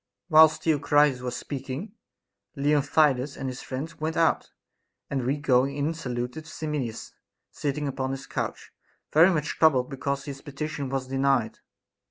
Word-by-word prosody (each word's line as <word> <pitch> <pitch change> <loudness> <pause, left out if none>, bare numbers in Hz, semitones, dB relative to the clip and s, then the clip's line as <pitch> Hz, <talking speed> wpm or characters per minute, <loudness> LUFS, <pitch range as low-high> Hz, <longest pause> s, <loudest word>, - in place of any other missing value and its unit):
6. - - -24
Whilst 155 0 +7
Theocritus 145 -3 +3
was 125 -1 -3
speaking, 140 - -6 0.6
Leontidas 145 -1 +2
and 135 - -4
his 125 -1 -5
friends 140 +5 -6
went 160 +1 -2
out; 165 -1 +2 0.6
and 135 -2 -1
we 140 +3 +1
going 140 -1 +2
in 145 +3 0
saluted 125 0 -5
Simmias, 150 -9 -4 0.4
sitting 145 0 -2
upon 130 -1 -2
his 135 0 -5
couch, - - -4 0.4
very 165 +4 +7
much 155 -5 -1
troubled 140 -5 +4
because 140 +1 -3
his 140 -2 -7
petition 145 -1 -5
was 135 -1 -2
denied. 135 -3 +1
140 Hz, 145 wpm, -26 LUFS, 130-155 Hz, 0.6 s, Whilst